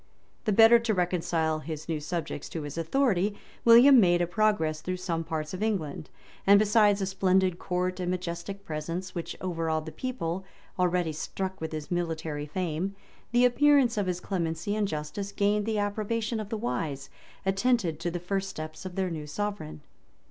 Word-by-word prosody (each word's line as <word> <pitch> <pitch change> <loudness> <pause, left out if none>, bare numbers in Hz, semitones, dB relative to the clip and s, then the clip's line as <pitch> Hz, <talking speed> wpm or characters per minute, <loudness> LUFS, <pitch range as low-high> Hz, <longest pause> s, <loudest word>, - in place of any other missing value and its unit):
The 215 - +2
better 225 +3 +7
to 230 -2 0
reconcile 165 -3 0
his 155 0 -6
new 160 -2 -1
subjects 160 -1 -4
to 160 - -5
his 145 -1 -6
authority, 205 - +1 0.3
William 245 +3 +8
made 175 -4 +4
a 175 - +2
progress 170 -4 +1
through 185 +2 -3
some 170 -3 -2
parts 155 0 -4
of 185 - -5
England; 180 -10 -2 0.4
and 200 +1 +8
besides 210 -1 +4
a - - +1
splendid 190 -1 +2
court 180 +1 -2
and 180 -1 -2
majestic 180 +2 -4
presence, 165 +4 -4
which 170 -2 -5
overawed 165 -3 -1
the 160 - -6
people, 190 -8 -3 0.4
already 180 -2 +1
struck 190 +4 -4
with 160 - -3
his 155 0 -6
military 160 -4 -2
fame, 180 +3 -2 0.4
the 240 +1 +5
appearance 270 -1 +4
of 205 -3 0
his 180 -1 -1
clemency 175 +1 -2
and 210 -1 +1
justice 155 +5 -4
gained 205 +1 +1
the 220 -1 0
approbation 215 +2 -1
of 210 -2 -5
the 225 - -2
wise, 150 - -3 0.3
attentive 195 -4 +1
to 175 - -2
the 175 +1 -3
first 195 +2 -2
steps 155 +3 -7
of 180 - -9
their 190 -2 -1
new 155 -2 -5
sovereign. 200 -4 -4
185 Hz, 175 wpm, -28 LUFS, 160-205 Hz, 0.4 s, William